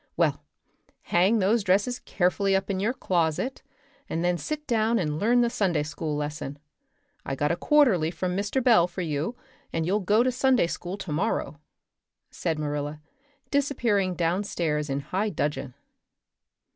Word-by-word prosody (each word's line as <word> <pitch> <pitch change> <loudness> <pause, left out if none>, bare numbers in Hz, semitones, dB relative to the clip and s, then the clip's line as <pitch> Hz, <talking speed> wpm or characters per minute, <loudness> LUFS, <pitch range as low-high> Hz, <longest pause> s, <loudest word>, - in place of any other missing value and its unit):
Well, - - +1 0.6
hang 190 +6 +3
those 210 +2 +2
dresses 200 +7 +2
carefully 195 +1 +1
up 190 +1 0
in 190 - -1
your 210 +5 +1
closet, 180 - -1 0.5
and 165 +2 -1
then 180 0 +2
sit 300 - -4
down 230 -2 +2
and 150 -5 -1
learn 240 +5 +4
the 240 - +2
Sunday 185 -10 +1
school 150 0 -4
lesson. 145 -1 -4 0.7
I 135 - -3
got 145 +3 0
a - - +1
quarterly 225 - +3
from 180 +2 -3
Mr. 205 +6 -1
Bell 220 -9 +5
for 185 - -6
you 160 - -2 0.4
and 165 -1 -1
you'll 195 +5 +1
go 210 +4 +3
to 255 - +2
Sunday 255 -3 +3
school 175 +2 -5
tomorrow," 165 -4 -2 0.7
said 160 -2 -2
Marilla, 150 0 -3 0.5
disappearing 235 -10 +1
downstairs 165 -4 -1
in 135 +1 -1
high 190 +9 -1
dudgeon. 145 -7 -3
185 Hz, 150 wpm, -26 LUFS, 155-225 Hz, 0.7 s, Bell